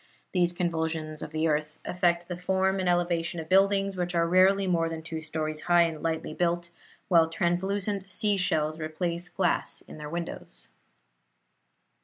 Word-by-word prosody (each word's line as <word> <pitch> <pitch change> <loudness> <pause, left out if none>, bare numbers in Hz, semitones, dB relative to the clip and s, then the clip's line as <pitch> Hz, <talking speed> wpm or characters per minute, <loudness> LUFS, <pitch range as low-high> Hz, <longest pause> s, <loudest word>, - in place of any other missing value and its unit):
These 175 -2 +2
convulsions 160 -3 -2
of - - -5
the 155 +1 0
earth 150 0 -1
affect 175 -1 +1
the 180 - -4
form 190 +2 0
and 185 -1 +1
elevation 175 -1 0
of 160 - -6
buildings, 195 +1 +3
which 180 -1 -2
are 170 0 +3
rarely 190 +3 +4
more 165 -3 +1
than 160 -1 -6
two 160 -1 -5
stories 155 -1 -3
high 175 0 +6
and 160 -2 -3
lightly 160 -1 -2
built, 175 0 -1 0.4
while 165 -3 +5
translucent 190 +3 -1
sea 205 +1 +1
shells 155 -4 0
replace 170 +2 -3
glass 180 -2 +1
in - - -12
their 150 0 -6
windows. 170 - -6
175 Hz, 160 wpm, -28 LUFS, 160-185 Hz, 0.4 s, high